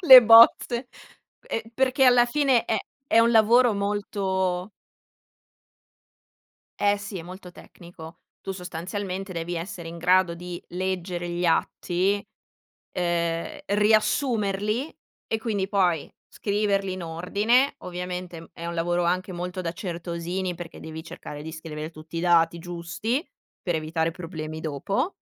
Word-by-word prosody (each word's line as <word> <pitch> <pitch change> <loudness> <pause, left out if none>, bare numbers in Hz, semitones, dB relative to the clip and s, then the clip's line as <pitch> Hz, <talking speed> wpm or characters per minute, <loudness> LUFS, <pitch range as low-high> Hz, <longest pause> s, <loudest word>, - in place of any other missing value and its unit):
le 260 -1 +13
bozze, 235 +2 +7 0.5
ehm, - - -3
perché 265 +3 +1
alla 245 -1 +6
fine 265 -1 +2
è 220 - 0 0.3
è 225 - +4
un 230 +1 +5
lavoro 230 +1 +5
molto 195 -2 -1 2.1
Eh, 205 0 +3
sì. 205 -2 -6
È - - -7
molto 180 +1 -10
tecnico. 170 -2 -13 0.2
Tu, 195 - -6
sostanzialmente, 185 +2 -5
devi 170 0 -4
essere 170 0 -6
in 170 +1 -8
grado 180 0 +3
di 175 0 -7
leggere 180 -1 -3
gli 175 +1 -2
atti, 185 +3 +1 0.7
ehm, 170 -2 -1
riassumerli, 215 +3 +1 0.3
e, 225 - -1
quindi, 205 -4 -2
poi, 180 -6 +1 0.2
scriverli 200 -2 0
in 185 -1 -5
ordine, 205 - +1
ovviamente, 180 -1 -6
mhmm, 165 - -13
è 170 - -7
un 170 - -4
lavoro 175 +1 0
anche 185 +2 0
molto 180 +1 -4
da 165 - -3
certosini, 175 +1 -4
perché 170 -1 -9
devi 160 0 -7
cercare 150 -2 -9
di 160 - -6
scrivere 160 -1 -6
tutti 160 +1 -11
i - - -1
dati 170 -1 +3
giusti, 175 - -3 0.4
per 175 -3 -1
evitare 160 +1 -1
problemi 160 -2 -6
dopo, 160 - -2
180 Hz, 135 wpm, -25 LUFS, 170-205 Hz, 2.1 s, le